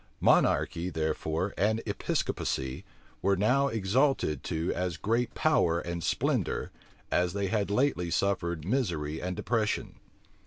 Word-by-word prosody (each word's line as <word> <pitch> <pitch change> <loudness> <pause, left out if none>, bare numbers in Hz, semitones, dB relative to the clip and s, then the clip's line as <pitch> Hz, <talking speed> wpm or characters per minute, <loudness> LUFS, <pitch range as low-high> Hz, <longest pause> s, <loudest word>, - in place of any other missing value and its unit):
Monarchy, 85 +2 +3
therefore, 80 +3 -1
and 110 +3 +2
Episcopacy, 65 0 -2 0.4
were 100 +1 +3
now 125 +8 +3
exalted 115 - +1
to 80 +2 -1
as 90 -2 -2
great 115 +6 0
power 90 - +3
and 85 -1 -4
splendor - - 0 0.4
as 90 0 +2
they 100 -1 -1
had 105 -1 0
lately 105 -6 +1
suffered 85 -4 0
misery 85 - -1
and 90 0 -3
depression. 110 +2 -1
95 Hz, 120 wpm, -29 LUFS, 85-110 Hz, 0.4 s, Monarchy